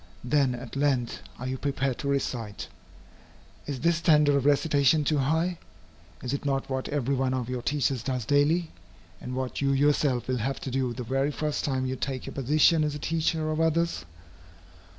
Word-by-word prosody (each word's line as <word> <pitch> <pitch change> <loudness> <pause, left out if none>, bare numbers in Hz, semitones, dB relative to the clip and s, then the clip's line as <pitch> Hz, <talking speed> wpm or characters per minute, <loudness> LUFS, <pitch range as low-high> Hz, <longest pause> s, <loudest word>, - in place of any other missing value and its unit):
Then 130 -1 +2
at 120 - -9
length 135 -4 0 0.2
are 130 - -6
you 130 0 -3
prepared 140 -2 -1
to 140 - -3
recite. 120 -7 -2 1.0
Is 140 -3 -4
this 170 0 +3
standard 150 -3 +4
of 140 0 +2
recitation 145 0 +3
too 150 0 +1
high? 160 +5 0 0.6
Is 125 +1 -2
it 140 - -3
not 135 -1 -1
what 130 0 -2
every 140 -2 0
one 130 -1 0
of 125 -2 -3
your 125 -1 -3
teachers 135 -2 0
does 125 -2 -2
daily, 150 +5 +2 0.5
and 125 0 -5
what 130 +1 -3
you 140 0 +2
yourself 140 -2 +2
will 130 -1 0
have 135 +4 -2
to 135 - -4
do 130 -1 0
the 125 +1 -5
very 135 +4 0
first 150 0 -2
time 130 -2 0
you 130 0 -2
take 130 0 -4
your - - -7
position 155 +4 +3
as 150 -1 -1
a - - -3
teacher 160 0 -1
of 155 +1 0
others? 165 +1 +1
140 Hz, 190 wpm, -27 LUFS, 130-150 Hz, 1.0 s, standard